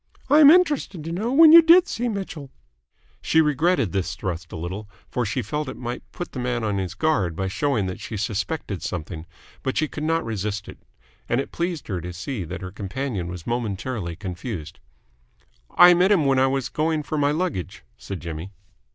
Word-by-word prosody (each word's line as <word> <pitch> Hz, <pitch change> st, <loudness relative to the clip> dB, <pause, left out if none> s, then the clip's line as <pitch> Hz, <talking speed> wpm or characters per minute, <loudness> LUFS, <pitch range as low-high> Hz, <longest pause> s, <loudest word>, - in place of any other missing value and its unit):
I 295 Hz, -, +7 dB
am 290 Hz, -2 st, +9 dB
interested 295 Hz, -, +3 dB
to 165 Hz, -, -5 dB
know 210 Hz, +8 st, -2 dB
when 315 Hz, +3 st, +8 dB
you 335 Hz, +1 st, +11 dB
did 345 Hz, +3 st, +6 dB
see 240 Hz, +1 st, -2 dB
Mitchell?" 190 Hz, -9 st, -5 dB, 0.7 s
She 160 Hz, -, +2 dB
regretted 150 Hz, -, +2 dB
this 95 Hz, -1 st, -2 dB
thrust 90 Hz, -4 st, -5 dB
a -, -, -6 dB
little, 95 Hz, +6 st, -6 dB, 0.2 s
for 125 Hz, -2 st, -2 dB
she 120 Hz, +5 st, -2 dB
felt 150 Hz, -2 st, -3 dB
it -, -, -8 dB
might 120 Hz, 0 st, -5 dB
put 175 Hz, -, -6 dB
the 130 Hz, -, -6 dB
man 125 Hz, -1 st, -2 dB
on 105 Hz, -2 st, -1 dB
his 90 Hz, -2 st, -4 dB
guard 125 Hz, -, 0 dB
by 95 Hz, +3 st, -2 dB
showing 110 Hz, +2 st, 0 dB
that 90 Hz, -1 st, -5 dB
she 110 Hz, -, -6 dB
suspected 105 Hz, -, -3 dB
something 80 Hz, -2 st, -5 dB, 0.3 s
but 130 Hz, -, -2 dB
she 155 Hz, -, +2 dB
could 150 Hz, -, -7 dB
not 165 Hz, +1 st, 0 dB
resist 105 Hz, -1 st, -3 dB
it, -, -, -11 dB, 0.5 s
and 120 Hz, -, +2 dB
it 135 Hz, -, -4 dB
pleased 170 Hz, -2 st, -3 dB
her 95 Hz, -5 st, -3 dB
to 90 Hz, +1 st, -6 dB
see 100 Hz, +4 st, -4 dB
that 90 Hz, +4 st, -7 dB
her 90 Hz, 0 st, -6 dB
companion 105 Hz, -1 st, -4 dB
was 90 Hz, -2 st, -7 dB
momentarily 110 Hz, -5 st, -3 dB
confused. 90 Hz, -, -6 dB, 0.9 s
"I 175 Hz, 0 st, +8 dB
met 180 Hz, +3 st, +3 dB
him 175 Hz, -8 st, +4 dB
when 135 Hz, -1 st, +3 dB
I 135 Hz, -, +4 dB
was 135 Hz, -1 st, -1 dB
going 155 Hz, 0 st, -1 dB
for 155 Hz, +1 st, -3 dB
my 145 Hz, 0 st, +3 dB
luggage," 155 Hz, -, -3 dB
said 100 Hz, -3 st, -7 dB
Jimmy. 85 Hz, +2 st, -6 dB
125 Hz, 200 wpm, -23 LUFS, -, 0.9 s, you